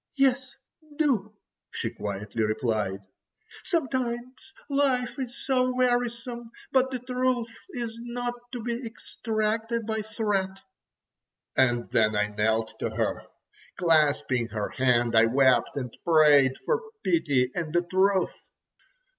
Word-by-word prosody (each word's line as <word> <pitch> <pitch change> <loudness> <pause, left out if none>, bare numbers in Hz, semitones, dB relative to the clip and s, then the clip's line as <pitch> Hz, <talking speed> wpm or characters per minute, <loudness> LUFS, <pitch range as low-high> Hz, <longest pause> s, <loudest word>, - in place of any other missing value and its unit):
"Yes, 270 -1 +1 0.4
do!" 220 -9 +1 0.3
she - - -3
quietly 105 +2 -4
replied; 110 -3 -1 0.6
"sometimes 260 -2 -2 0.2
life 275 -3 0
is 255 -1 -6
so 255 -1 +2
wearisome. 245 -1 0 0.2
But 260 0 +3
the 260 - -2
truth 250 -1 -1 0.2
is 235 -8 -5
not 240 0 -3 0.2
to 245 -3 -5
be 235 +2 -3
extracted 225 0 -2
by 220 0 -1
threat." 210 -3 -1 1.0
And 120 -2 +2
then 110 -1 +3
I 105 0 +1
knelt 110 +1 0
to - - -1
her. - - -2 0.5
Clasping 140 -8 +2
her 105 -3 -3
hand 120 -3 +2
I 115 0 +6
wept, 130 0 +3
and 125 -4 -4
prayed 150 -5 +5
for 470 -1 +1 0.2
pity 135 - +2
and 165 -3 -3
the 175 +2 +2
truth. 190 +2 +2
215 Hz, 120 wpm, -27 LUFS, -, 1.0 s, I